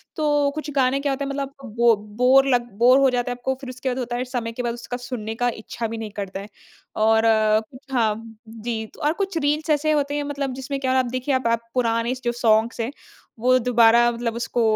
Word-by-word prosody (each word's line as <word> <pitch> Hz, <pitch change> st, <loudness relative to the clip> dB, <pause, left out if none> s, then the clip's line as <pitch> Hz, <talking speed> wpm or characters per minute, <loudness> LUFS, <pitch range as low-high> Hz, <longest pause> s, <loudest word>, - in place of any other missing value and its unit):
तो 295 Hz, -2 st, +2 dB
कुछ 310 Hz, -1 st, -5 dB
गाने 265 Hz, 0 st, +2 dB
क्या 280 Hz, 0 st, -1 dB
होता 280 Hz, +1 st, -2 dB
है -, -, -4 dB
मतलब 275 Hz, 0 st, -4 dB, 0.2 s
बो 235 Hz, -1 st, +5 dB, 0.3 s
बोर 270 Hz, +2 st, +6 dB
लग 240 Hz, -1 st, +1 dB
बोर 250 Hz, +3 st, +6 dB
हो 270 Hz, -1 st, +5 dB
जाता 245 Hz, 0 st, -1 dB
है -, -, -3 dB
आपको 265 Hz, +2 st, -2 dB
फ़िर 260 Hz, -, -7 dB
उसके 255 Hz, +1 st, -4 dB
बाद 255 Hz, +1 st, -2 dB
होता 240 Hz, -1 st, -3 dB
है 245 Hz, -, -2 dB
इस 250 Hz, 0 st, -6 dB
समय 230 Hz, -3 st, -2 dB
के 245 Hz, +2 st, -5 dB
बाद 235 Hz, -1 st, -1 dB
उसका 240 Hz, +1 st, -6 dB
सुनने 230 Hz, -3 st, -5 dB
का 245 Hz, +1 st, +1 dB
इच्छा 230 Hz, +1 st, -4 dB
भी 225 Hz, +1 st, -5 dB
नहीं 220 Hz, -2 st, -6 dB
करता 195 Hz, 0 st, -5 dB
है। 200 Hz, -, -8 dB, 0.6 s
और 220 Hz, 0 st, +4 dB, 0.7 s
हाँ 230 Hz, -5 st, +2 dB, 0.3 s
जी 225 Hz, 0 st, -4 dB, 0.2 s
और 300 Hz, +1 st, +2 dB
कुछ 385 Hz, -3 st, -2 dB
रील्स 300 Hz, +1 st, 0 dB
ऐसे 305 Hz, +1 st, +2 dB
होते 290 Hz, -1 st, 0 dB
हैं 290 Hz, -, -1 dB
मतलब 280 Hz, -2 st, -3 dB
जिसमें 265 Hz, +2 st, -4 dB
क्या 260 Hz, -1 st, 0 dB
आप 255 Hz, -, +1 dB
देखिए 255 Hz, +2 st, -1 dB
आप 255 Hz, -2 st, 0 dB
आप 230 Hz, 0 st, -1 dB
पुराने 230 Hz, -1 st, +1 dB
जो 240 Hz, -, +1 dB
सॉन्ग्स 230 Hz, -1 st, +2 dB
हैं 230 Hz, -, -2 dB, 0.5 s
वो 255 Hz, +2 st, +4 dB
दोबारा 235 Hz, 0 st, +5 dB
मतलब 230 Hz, -1 st, -3 dB
उसको 235 Hz, 0 st, -2 dB
245 Hz, 230 wpm, -23 LUFS, 230-275 Hz, 0.7 s, बोर